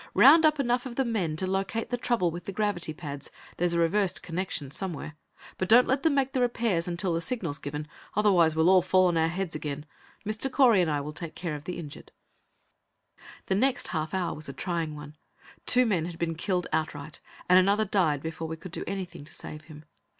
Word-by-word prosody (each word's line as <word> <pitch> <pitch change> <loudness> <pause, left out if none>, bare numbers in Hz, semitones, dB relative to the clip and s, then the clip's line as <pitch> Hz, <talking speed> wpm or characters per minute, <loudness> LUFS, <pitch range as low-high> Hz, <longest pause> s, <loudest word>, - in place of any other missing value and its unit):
Round 320 -1 +8
up 305 -1 +1
enough 245 -1 0
of 240 - -8
the 270 - +1
men 195 -10 -1
to 185 - -1
locate 195 +5 -2
the - - +2
trouble 230 -8 +1
with 175 +1 -8
the - - -4
gravity 205 -5 -1
pads; 145 -3 -7 0.3
there's 175 0 +1
a - - +2
reversed 185 +3 +1
connection 165 -5 -4
somewhere. 155 -2 -5 0.4
But 185 - -1
don't 245 +3 +7
let 265 +1 +1
them 320 -3 +2
make 270 -1 +1
the 255 - +1
repairs 230 -8 0
until 175 +1 -1
the 165 - -1
signal 180 - -2
is 145 - -5
given. 150 +1 -5 0.3
Otherwise, 180 -6 +4
we'll 160 +3 +4
all 185 -1 +6
fall 185 +1 +3
on 175 - -1
our 160 0 +3
heads 180 +1 -3
again. 150 -1 -5 0.4
Mr. 215 +5 +1
Correy 240 -9 +5
and 170 - +1
I 145 -1 0
will 150 +2 -6
take 165 +1 -6
care 170 -3 -4
of 150 0 -7
the 180 - -4
injured." 150 -4 -9 1.3
The - - 0
next 255 +7 +1
half 160 +1 -2
hour 180 -2 -1
was 155 -1 -7
a - - -6
trying 165 -3 -3
one. 150 0 -10 0.5
Two 250 0 +6
men 185 -8 +1
had 170 -1 -7
been 165 0 -1
killed 180 +2 -1
outright, 155 -1 -3 0.3
and 180 +1 +7
another 200 +3 +3
died 165 -8 +1
before 160 0 -4
we 160 0 -5
could 175 +2 -10
do - - -4
anything 190 -6 -5
to 155 - -10
save 150 0 -8
him. 150 -1 -13
175 Hz, 220 wpm, -28 LUFS, 155-210 Hz, 1.3 s, Round